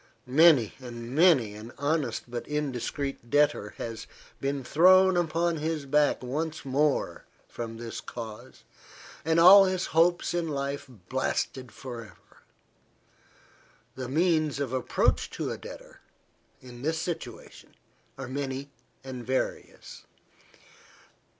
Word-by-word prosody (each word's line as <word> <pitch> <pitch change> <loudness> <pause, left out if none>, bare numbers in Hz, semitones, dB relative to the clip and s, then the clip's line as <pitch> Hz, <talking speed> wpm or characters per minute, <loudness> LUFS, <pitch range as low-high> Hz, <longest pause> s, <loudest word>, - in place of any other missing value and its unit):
Many 140 -3 +5
and 120 -2 -8
many 150 - +4
an 110 +3 -10
honest 145 -4 -1
but 120 0 -6
indiscreet 140 -3 -3
debtor 145 -7 +2
has 115 -1 -6 0.3
been 140 0 -2
thrown 185 +6 +5
upon 170 0 +1
his 155 -1 -2
back 145 -1 +2
once 155 +5 -3
more 140 +2 0 0.2
from 115 -1 -7
this 115 -1 -6
cause, 115 +1 -9 0.6
and 160 +1 +2
all 195 +3 +9
his 185 -1 -1
hopes 175 +2 +3
in 170 -1 -1
life 140 -1 -3
blasted 125 +3 -3
for 125 -3 -8
ever. 100 -7 -17 1.5
The 130 -1 -6
means 155 -1 +1
of 135 -3 -2
approach 130 - +1
to - - -2
a - - -4
debtor, - - -11 0.6
in 120 -1 -12
this 160 +4 -1
situation, 160 -8 -7 0.4
are 135 -1 -6
many 135 +1 -4 0.3
and 130 -2 -7
various. 130 +2 -4
140 Hz, 120 wpm, -28 LUFS, 125-160 Hz, 1.5 s, all